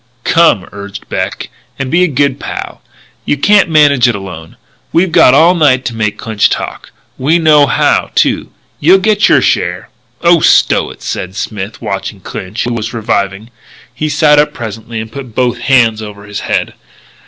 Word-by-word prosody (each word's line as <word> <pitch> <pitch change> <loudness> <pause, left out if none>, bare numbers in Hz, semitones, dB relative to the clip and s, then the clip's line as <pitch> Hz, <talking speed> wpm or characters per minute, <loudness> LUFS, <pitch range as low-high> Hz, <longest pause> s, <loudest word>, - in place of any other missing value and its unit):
"Come," 165 - +3
urged 100 0 -9
Beck, - - -4 0.3
"and 135 -1 -4
be 175 +3 +3
a - - +3
good 140 -2 0
pal. - - -7 0.4
You 145 - -1
can't 200 +5 +3
manage 145 -5 +4
it 120 - 0
alone. 90 -5 -9 0.3
We've 175 +1 +1
got 130 - +5
all 165 +5 +5
night 140 -7 +2
to 120 - -3
make 105 -2 -2
Clinch 110 -2 0
talk. - - -5 0.3
We 150 +6 +2
know 150 -3 +4
how, - - +1
too. - - +1 0.3
You'll 180 +6 +5
get 210 +2 +2
your - - +4
share - - -1 0.2
" - - -40
"Oh, 170 0 +5
stow - - +3
it," - - -13
said 95 +1 -5
Smith, 105 0 -6
watching 100 -1 -4
Clinch, 95 +4 -6
who 120 -1 -2
was 115 +1 -4
reviving. 105 -1 -2 0.4
He 155 - -3
sat 150 0 +3
up 150 - +1
presently, 115 0 -6
and 110 0 -7
put 130 -4 -9
both 125 -2 0
hands 115 -5 +2
over 105 -1 -9
his 100 0 -6
head. - - -2
120 Hz, 175 wpm, -12 LUFS, 105-150 Hz, 0.4 s, got